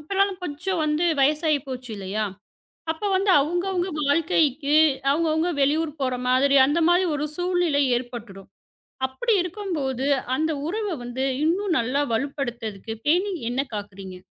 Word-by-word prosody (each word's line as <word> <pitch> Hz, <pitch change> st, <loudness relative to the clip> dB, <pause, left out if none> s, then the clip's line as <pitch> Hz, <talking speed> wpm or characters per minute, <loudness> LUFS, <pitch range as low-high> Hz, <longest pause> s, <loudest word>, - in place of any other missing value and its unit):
இப்பனாலும் 390 Hz, +4 st, 0 dB
கொஞ்சம் 345 Hz, +3 st, -3 dB
வந்து 305 Hz, +2 st, +1 dB, 0.2 s
வயசாயி 300 Hz, +2 st, +3 dB
போச்சு 255 Hz, -2 st, -7 dB
இல்லையா? 200 Hz, +2 st, -3 dB, 0.7 s
அப்போ 330 Hz, +6 st, -3 dB
வந்து 385 Hz, +1 st, +2 dB
அவங்கவங்க 355 Hz, +5 st, -1 dB, 0.2 s
வாழ்க்கைக்கு 295 Hz, -1 st, +2 dB, 0.3 s
அவங்கவங்க 320 Hz, +3 st, +1 dB
வெளியூர் 300 Hz, +3 st, +1 dB
போற 255 Hz, -1 st, 0 dB
மாதிரி 265 Hz, +2 st, +3 dB
அந்த 300 Hz, +5 st, +1 dB
மாரி 355 Hz, +2 st, +4 dB
ஒரு 295 Hz, +1 st, -2 dB
சூழ்நிலை 355 Hz, -4 st, +1 dB, 0.2 s
ஏற்பட்டுடும். 235 Hz, -6 st, -8 dB, 0.6 s
அப்படி 435 Hz, -, 0 dB
இருக்கும்போது 320 Hz, -, -3 dB, 0.3 s
அந்த 315 Hz, +2 st, 0 dB, 0.2 s
உறவு 415 Hz, +1 st, -2 dB
வந்து 250 Hz, +2 st, -2 dB, 0.2 s
இன்னும் 355 Hz, +2 st, +1 dB
நல்லா 255 Hz, +4 st, 0 dB
வலுப்படுத்தறதுக்கு, 235 Hz, -5 st, -4 dB
பேணி 365 Hz, +6 st, +2 dB, 0.2 s
என்ன 250 Hz, +2 st, -1 dB
காக்குறீங்க? 195 Hz, -3 st, -7 dB
295 Hz, 125 wpm, -24 LUFS, 255-350 Hz, 0.7 s, மாரி